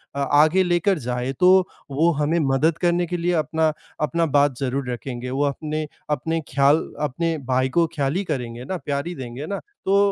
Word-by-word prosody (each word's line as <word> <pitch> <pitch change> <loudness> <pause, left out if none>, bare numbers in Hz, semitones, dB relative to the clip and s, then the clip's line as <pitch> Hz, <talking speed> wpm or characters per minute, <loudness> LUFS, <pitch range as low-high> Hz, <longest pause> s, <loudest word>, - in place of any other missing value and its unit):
अ, - - -2
आगे 155 +6 +4
लेकर 175 +1 +2
जाएँ, 125 +1 -2
तो 185 0 +6 0.2
वो 160 +5 +3
हमें 160 +3 +2
मदद 155 +4 +2
करने 175 0 +1
के 175 - -2
लिए 175 +1 0
अपना 160 -1 +1 0.3
अपना 165 +2 +1
बात 140 -3 +3
ज़रूर 135 -1 -2
रखेंगे। 125 0 -5
वो 135 +3 0
अपने 155 +2 -3 0.2
अपने 160 +3 -1
ख़्याल 140 +2 +5 0.2
अपने 160 +3 -1
भाई 130 0 +2
को 170 - +5
ख़्याल 140 0 0
ही 195 - 0
करेंगे 125 -6 -4
ना 185 +6 -3
प्यार 140 +1 -2
ही 175 - -5
देंगे 130 +1 -6
ना। 200 - -3 0.3
तो 195 +1 +3
150 Hz, 190 wpm, -23 LUFS, 135-170 Hz, 0.3 s, तो